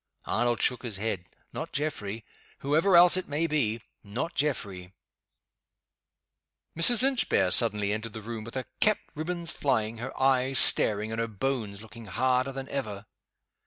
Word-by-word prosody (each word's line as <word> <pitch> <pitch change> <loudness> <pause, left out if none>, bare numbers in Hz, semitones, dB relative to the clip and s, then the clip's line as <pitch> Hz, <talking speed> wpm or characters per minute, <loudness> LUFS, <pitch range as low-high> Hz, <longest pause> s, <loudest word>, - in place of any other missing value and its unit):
Arnold 120 0 0
shook 125 -2 +1
his 115 -6 -6
head. 95 -4 -4 0.2
"Not - - -6
Geoffrey. 115 -7 -4 0.4
Whoever 160 +7 +2
else 175 +1 +7
it 185 - -4
may 150 +3 -1
be 120 -8 -1 0.2
not 115 +11 -5
Geoffrey!" 100 -10 -2 1.8
Mrs. 225 +9 +7
Inchbare 240 - +1
suddenly 105 -2 +2
entered 110 0 -6
the 110 - -8
room 115 0 -7
with 115 +3 -10
her 130 -1 -3
cap 215 0 +3 0.2
ribb 155 +3 -5
ons 170 -2 -4
flying, 115 -5 -1
her 120 - -7
eyes 130 0 +2
staring, 105 +1 +5
and 115 - -4
her 115 - -2
bones 110 -2 -4
looking 115 +1 -12
harder 130 +6 0
than 135 0 -7
ever. 105 -7 -5
120 Hz, 155 wpm, -27 LUFS, 110-145 Hz, 1.8 s, else